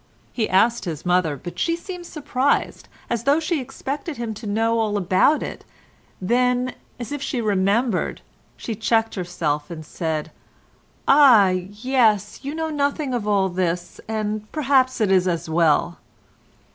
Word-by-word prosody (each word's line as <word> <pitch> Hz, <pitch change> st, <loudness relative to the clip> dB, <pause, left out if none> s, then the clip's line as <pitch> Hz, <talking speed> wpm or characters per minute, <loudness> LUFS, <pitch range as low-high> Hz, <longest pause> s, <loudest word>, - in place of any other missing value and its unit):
He 225 Hz, -3 st, -1 dB
asked 230 Hz, +5 st, +3 dB
his 160 Hz, -2 st, -5 dB
mother, 180 Hz, -5 st, +1 dB
but 175 Hz, +6 st, -8 dB
she 335 Hz, -, +1 dB
seemed 350 Hz, 0 st, -8 dB
surprised, 285 Hz, -3 st, -1 dB, 0.2 s
as 235 Hz, 0 st, -2 dB
though 285 Hz, +3 st, +4 dB
she 325 Hz, -2 st, -1 dB
expected 285 Hz, +4 st, -5 dB
him 230 Hz, -2 st, -3 dB
to 215 Hz, +1 st, -8 dB
know 225 Hz, +2 st, +1 dB
all 215 Hz, -2 st, 0 dB
about 190 Hz, -, +3 dB
it, -, -, -7 dB, 0.6 s
then, 250 Hz, +5 st, +1 dB, 0.3 s
as 240 Hz, +2 st, -6 dB
if 290 Hz, -1 st, -4 dB
she 265 Hz, -, -2 dB
remembered, 205 Hz, +1 st, 0 dB, 0.4 s
she 230 Hz, -, -4 dB
checked 225 Hz, +1 st, +1 dB
herself 165 Hz, -5 st, -2 dB
and 160 Hz, -2 st, -8 dB
said, 160 Hz, -1 st, -3 dB, 0.8 s
"Ah! 260 Hz, -9 st, +7 dB
yes—you 215 Hz, -, 0 dB
know 320 Hz, 0 st, -2 dB
nothing 285 Hz, -1 st, -1 dB
of 230 Hz, -4 st, -2 dB
all 200 Hz, -2 st, +2 dB
this, 175 Hz, -1 st, -3 dB
and 215 Hz, -1 st, -3 dB
perhaps 265 Hz, -4 st, +2 dB
it 205 Hz, -3 st, +2 dB
is 185 Hz, -1 st, +3 dB
as 170 Hz, -2 st, -1 dB
well." 165 Hz, +1 st, +2 dB
220 Hz, 145 wpm, -22 LUFS, 185-265 Hz, 0.8 s, Ah